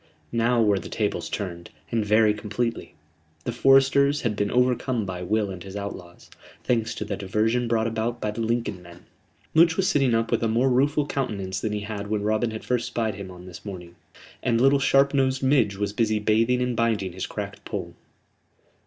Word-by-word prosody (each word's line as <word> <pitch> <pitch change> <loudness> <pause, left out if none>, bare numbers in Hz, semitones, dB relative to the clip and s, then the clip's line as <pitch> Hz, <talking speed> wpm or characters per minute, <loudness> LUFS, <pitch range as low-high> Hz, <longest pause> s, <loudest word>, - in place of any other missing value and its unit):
Now 120 +1 +2
were 100 -2 +3
the - - -9
tables 105 -2 -2
turned, 85 -4 -5 0.2
and 115 -2 +1
very 105 +1 +4
completely. 105 +3 -3 0.5
The - - -2
foresters 135 +3 +4
had 115 -4 -1
been 100 0 0
overcome 125 -1 +1
by 90 -1 -5
Will 105 +2 0
and 90 -2 -8
his 95 0 -9
outlaws, 95 -4 -8 0.3
thanks 115 -3 0
to - - -4
the 100 - -3
diversion 110 +5 0
brought 115 -1 +1
about 115 +1 -2
by 105 - -2
the 110 +2 -5
Lincoln 115 -4 -1
men. 85 0 -15 0.5
Much 160 0 +5
was 190 - +2
sitting 135 -5 +3
up 115 0 0
with - - +1
a 115 - +1
more 120 +4 +2
rueful 145 +4 +2
countenance 100 -9 -3
than 110 - -2
he 105 - -2
had 100 -1 -5
when 105 -1 -1
Robin 110 +2 +1
had 110 0 -7
first 125 -1 0
spied 115 -3 -1
him 100 -1 -8
on 90 -1 -11
this 90 -2 -11
morning; 90 -4 -8 0.5
and 115 -2 +1
little 135 +2 +4
sharp 135 +1 +3
nosed 130 -1 +1
Midge 130 -7 +3
was 100 0 -2
busy 110 0 +1
bathing 115 +4 +2
and 125 -1 -1
binding 110 -6 0
his 95 - -4
cracked - - -6
poll. - - -5
110 Hz, 195 wpm, -25 LUFS, 100-125 Hz, 0.5 s, Much